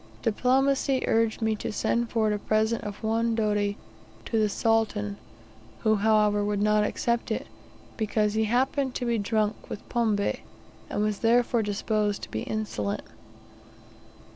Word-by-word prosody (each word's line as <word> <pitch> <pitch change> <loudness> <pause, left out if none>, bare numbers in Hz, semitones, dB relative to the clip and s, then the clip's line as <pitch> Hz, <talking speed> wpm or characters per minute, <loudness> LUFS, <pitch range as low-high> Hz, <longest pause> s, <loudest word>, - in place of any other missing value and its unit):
Diplomacy 260 +3 +2
urged 225 0 +1
me 220 0 +2
to - - -4
send 235 +2 0
forward 220 -2 +1
a 210 - -2
present 220 +2 +1
of 205 +1 -7
one 225 +1 +1
doti 205 -2 0 0.5
to 225 - 0
the 215 -1 +2
Sultan, 215 - 0 0.6
who, 215 -1 +3
however, 210 -1 +3
would 205 0 0
not 210 0 +3
accept 235 +2 -1
it, - - -2 0.5
because 215 -1 +1
he 220 0 +1
happened 260 +3 0
to 245 - -2
be 235 -2 +1
drunk 215 +1 -1
with - - -7
pombe, 220 -4 +1 0.6
and 205 - -1
was 210 -1 -1
therefore 235 +1 +3
disposed 210 0 -1
to - - -8
be 110 - -3
insolent. 160 - -3
215 Hz, 145 wpm, -27 LUFS, 210-230 Hz, 0.6 s, who